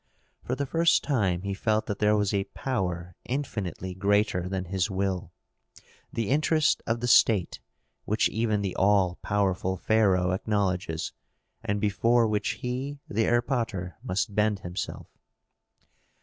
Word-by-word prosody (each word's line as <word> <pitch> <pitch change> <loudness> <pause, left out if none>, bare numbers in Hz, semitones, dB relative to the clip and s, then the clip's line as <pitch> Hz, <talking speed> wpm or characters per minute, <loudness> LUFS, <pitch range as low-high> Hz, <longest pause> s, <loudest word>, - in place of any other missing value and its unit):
For 125 - -2
the 140 - -2
first 165 +4 +3
time 95 - 0
he 100 0 -2
felt 110 +2 0
that 100 -2 -4
there 105 0 +3
was 105 -1 0
a 100 -1 +1
power 90 -9 -3
infinitely 105 - -4
greater 100 -1 +1
than 95 -1 -3
his 95 +2 -1
will, 95 -1 -2 0.8
the 115 -3 -2
interest 155 +1 +2
of 115 +1 0
the 120 - -1
state, 105 -6 +4 0.5
which 110 +1 +2
even 110 -2 0
the 95 -2 -3
all 95 -3 +3
powerful 95 -2 0
pharaoh 95 -3 +2
acknowledges 95 -5 -1 0.5
and 105 0 -1
before 115 +3 +3
which 105 -1 0
he 130 +4 -3
the 110 +2 0
erpatr 120 -7 0
must 100 +3 -2
bend 105 -1 +1
himself. 90 +2 -5
100 Hz, 135 wpm, -27 LUFS, 95-115 Hz, 0.8 s, state